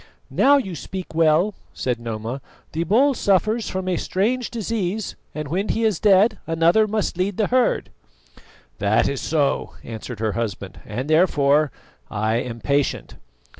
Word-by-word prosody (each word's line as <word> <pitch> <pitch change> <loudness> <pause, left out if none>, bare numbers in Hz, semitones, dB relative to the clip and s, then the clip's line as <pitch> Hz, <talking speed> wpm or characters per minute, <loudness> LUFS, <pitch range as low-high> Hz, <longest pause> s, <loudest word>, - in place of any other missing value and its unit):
"Now 285 +1 +5
you 195 -10 -3
speak 185 0 -7
well," 165 +5 +3 0.2
said 125 -2 -1
Noma; 115 +3 -5 0.3
"the 160 +2 -1
bull 255 - +4
suffers 215 +1 +1
from 190 0 -3
a 180 -2 +1
strange 235 +9 0
disease, 215 -3 -3 0.2
and 150 -1 -4
when 185 +8 -2
he 230 - 0
is 215 -6 +1
dead 210 +1 +4
another 165 +6 +3
must 210 -4 -2
lead 190 +1 0
the 215 - +2
herd." 255 -1 +1 0.9
"That 100 +2 +3
is 140 -1 -2
so," 150 -3 0
answered 115 0 -7
her 110 -1 0
husband, 100 -4 -4
"and, 120 +6 -4
therefore, 150 -3 +3 0.4
I 110 +2 0
am 120 -1 -4
patient." 140 +5 -1
170 Hz, 150 wpm, -22 LUFS, 130-210 Hz, 0.9 s, Now